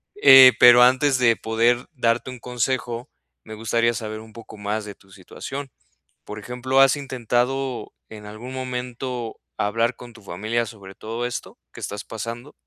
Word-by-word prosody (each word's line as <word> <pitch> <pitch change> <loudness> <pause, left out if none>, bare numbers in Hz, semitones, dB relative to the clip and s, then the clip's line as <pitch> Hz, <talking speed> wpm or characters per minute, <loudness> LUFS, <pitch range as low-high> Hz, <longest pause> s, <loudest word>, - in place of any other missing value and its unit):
Eh, 135 -9 +9
pero 120 0 +8
antes 130 +2 +4
de 115 -2 +4
poder 115 +3 0
darte 120 -1 0
un 125 - -10
consejo, 125 0 -3 0.3
me 110 - -9
gustaría 115 +2 0
saber 110 -1 -6
un 110 0 -14
poco 115 0 -12
más 105 +1 -3
de 100 -1 -9
tu 95 - -24
situación. 135 +9 -8 0.6
Por 105 - -8
ejemplo, 125 +4 0
¿has 135 +1 +5
intentado 130 -1 -2 0.2
en 105 -1 -11
algún 110 +5 -9
momento 125 -2 -5 0.2
hablar 115 +4 0
con 120 0 -12
tu 115 - -16
familia 110 +6 -2
sobre 100 -3 -12
todo 115 +4 -5
esto 125 - -6
que - - -12
estás 105 - -6
pasando? 115 +5 -7
120 Hz, 160 wpm, -22 LUFS, 110-125 Hz, 0.6 s, Eh